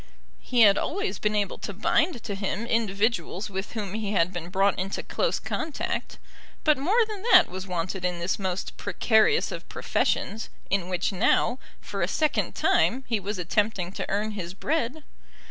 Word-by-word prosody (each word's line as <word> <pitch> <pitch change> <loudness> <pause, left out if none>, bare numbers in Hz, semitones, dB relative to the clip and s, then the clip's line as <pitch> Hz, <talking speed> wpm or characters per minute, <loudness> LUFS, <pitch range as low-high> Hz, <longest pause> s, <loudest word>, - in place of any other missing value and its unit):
He 245 -2 +1
had 205 -2 +7
always 405 +5 -2
been 210 0 0
able 205 -2 -1
to 200 - -5
bind 240 - +1
to 205 - -4
him 195 +2 -2
individuals 215 -2 0
with 190 +1 -4
whom 205 -4 -4
he 215 -1 -2
had 180 -1 +2
been 175 -1 -5
brought 195 +1 +2
into 190 +1 -3
close - - 0
contact; 315 -2 -3 0.5
but 305 -1 +5
more 420 - +3
than 425 -3 -6
that 360 -3 +8
was 185 +1 -6
wanted 180 +1 -3
in 180 -1 0
this 170 +4 -1
most 190 -1 -3
precarious 220 - +2
of - - -7
professions, 220 +3 -1 0.2
in 190 -2 +1
which 180 +1 0
now, 230 +4 +2 0.2
for - - -5
a - - +2
second 310 -1 0
time, 260 +3 +2
he 225 -3 0
was 200 +1 -4
attempting 185 0 0
to - - -5
earn 210 +2 0
his 185 -3 -6
bread. 300 +4 -1
205 Hz, 175 wpm, -26 LUFS, 190-240 Hz, 0.5 s, that